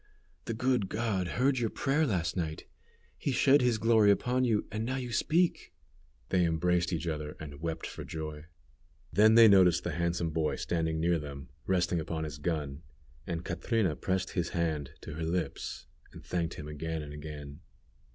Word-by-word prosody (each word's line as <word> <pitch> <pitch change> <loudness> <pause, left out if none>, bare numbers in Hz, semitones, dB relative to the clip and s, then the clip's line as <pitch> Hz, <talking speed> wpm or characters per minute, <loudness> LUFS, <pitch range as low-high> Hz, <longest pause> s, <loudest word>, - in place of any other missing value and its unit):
The 115 - -3
good 125 -4 +1
God 105 -5 -1
heard 130 +1 +3
your 115 -2 0
prayer 145 +7 +1
last 85 -7 -1
night. 80 -4 -3 0.5
He 140 - -1
shed 135 +3 +5
His 120 -2 +2
glory 110 -1 +4
upon 125 +5 +2
you, 115 -4 +2
and 110 +1 -2
now 130 +3 -2
you 125 -2 -4
speak." 170 +8 +1 0.5
They 90 -1 +3
embraced 85 +1 +1
each 85 -1 -2
other, 75 -2 -3
and 75 -2 -9
wept 80 0 -3
for - - -7
joy. 75 -1 -6 0.7
Then 110 +2 +6
they 115 -1 +9
noticed 90 -4 +5
the - - -2
handsome 85 -1 -1
boy 80 -1 0
standing 80 -2 -1
near 85 +1 +2
them, 70 -3 -8 0.2
resting 90 -2 +1
upon 80 0 -3
his 75 -2 -6
gun, 75 -3 -2 0.5
and 85 0 -3
Catrina 110 -10 0
pressed 95 +2 -1
his 90 -2 -1
hand 80 -5 -1
to - - -7
her 80 +2 -4
lips, 80 -3 -3 0.3
and - - -12
thanked 85 -2 -2
him 75 - -7
again 80 +1 -4
and 75 0 -8
again. 75 -1 -8
85 Hz, 175 wpm, -30 LUFS, 80-110 Hz, 0.7 s, they